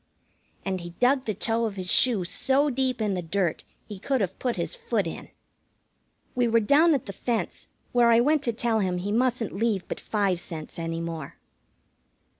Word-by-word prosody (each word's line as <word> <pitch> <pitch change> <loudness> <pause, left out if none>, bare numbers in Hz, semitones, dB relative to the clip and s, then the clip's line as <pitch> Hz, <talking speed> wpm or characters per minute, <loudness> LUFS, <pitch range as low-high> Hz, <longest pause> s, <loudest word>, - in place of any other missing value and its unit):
And 190 -2 -2
he 170 0 -9
dug 260 +2 +3
the 215 - -2
toe 230 +3 0
of 215 -3 -3
his 185 -2 -3
shoe 235 -7 +4
so 270 +10 +1
deep 255 -2 0
in 210 -2 +1
the 180 - -2
dirt 175 0 -1 0.2
he 205 -3 -8
could 270 +6 0
have 190 -3 -2
put 245 -2 -1
his - - -3
foot 470 -2 -1
in. - - -6 1.0
We 245 -1 +2
were 230 0 +4
down 295 +8 +5
at 265 - -3
the 195 - -6
fence, 235 +4 -3 0.2
where 240 -1 +4
I 230 0 +6
went 295 +4 +3
to 235 - +2
tell 230 0 0
him 185 -3 0
he 195 +3 -3
mustn't 240 -1 +1
leave 210 -2 0
but - - -4
five 200 -5 0
cents 165 -2 -8
any 165 0 -3
more. 165 -4 -5
220 Hz, 195 wpm, -26 LUFS, 185-250 Hz, 1.0 s, I